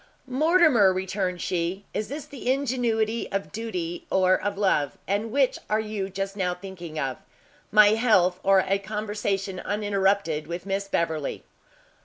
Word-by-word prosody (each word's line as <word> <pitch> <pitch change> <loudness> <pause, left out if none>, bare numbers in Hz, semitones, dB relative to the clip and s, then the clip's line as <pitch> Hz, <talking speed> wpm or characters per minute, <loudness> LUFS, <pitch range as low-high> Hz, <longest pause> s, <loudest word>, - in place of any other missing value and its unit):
"Mortimer," 275 - +4
returned 185 -1 -2
she, 180 +3 -2
"is 215 - -2
this 290 +1 -6
the 275 -4 -2
ingenuity 235 -4 0
of 195 0 -3
duty 180 -7 -4
or 185 -1 +3
of 200 +1 -3
love? 185 -8 +1
and 205 +3 -1
which 270 0 +2
are 215 - +2
you 210 -3 -3
just 195 +1 -4
now 180 -3 -1
thinking 180 -4 -9
of, 135 -3 -2 0.5
my 210 -1 +7
health, 210 -5 +3
or 195 -1 +4
a 195 +1 +2
conversation 205 -2 -3
uninterrupted 200 -6 0
with 170 +2 -5
Miss 200 0 -2
Beverley?" 160 -6 -2
200 Hz, 145 wpm, -25 LUFS, 185-220 Hz, 0.5 s, my